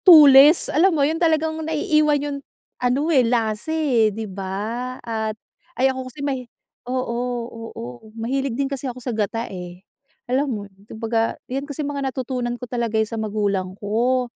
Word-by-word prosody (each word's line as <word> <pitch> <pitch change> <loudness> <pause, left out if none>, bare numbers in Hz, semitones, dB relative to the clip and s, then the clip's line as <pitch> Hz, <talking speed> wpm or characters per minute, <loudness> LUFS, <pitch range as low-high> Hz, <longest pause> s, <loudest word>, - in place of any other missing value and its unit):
Tulis, 295 -2 +9
alam 335 +2 +4
mo 280 - +4
yun, 320 +3 -1
talagang 320 -1 +2
naiiwan 305 -1 +2
yung 285 -1 -3 0.4
ano 275 +6 +1
eh, 265 - +6
lasa 230 0 0
eh, 275 -9 +3
'di 220 +2 -5
ba? 210 +6 -4
At 220 -2 -2 0.4
ay 265 +1 +3
ako 260 0 -6
kasi 280 +2 -6
may 260 -4 -3 0.4
oo, 255 -2 -1 0.6
oo. 120 - -9
Mahilig 255 +2 -1
din 280 - +1
kasi 270 -1 -3
ako 245 - -7
sa 250 -1 -4
gata 225 +2 -1
eh, 180 -1 -9 0.4
alam 270 +3 0
mo 210 -5 -3
yun, 200 +1 -21
kung - - -8
baga 225 0 0
'yan 275 +3 -4
kasi 290 +1 -3
mga 280 -2 -2
natutunan 250 -1 -3
ko 250 - -7
talaga 235 -2 -2
eh 220 - +3
sa 225 0 -4
magulang 200 -3 -1
ko. 240 +5 +1
250 Hz, 175 wpm, -22 LUFS, 220-280 Hz, 0.6 s, Tulis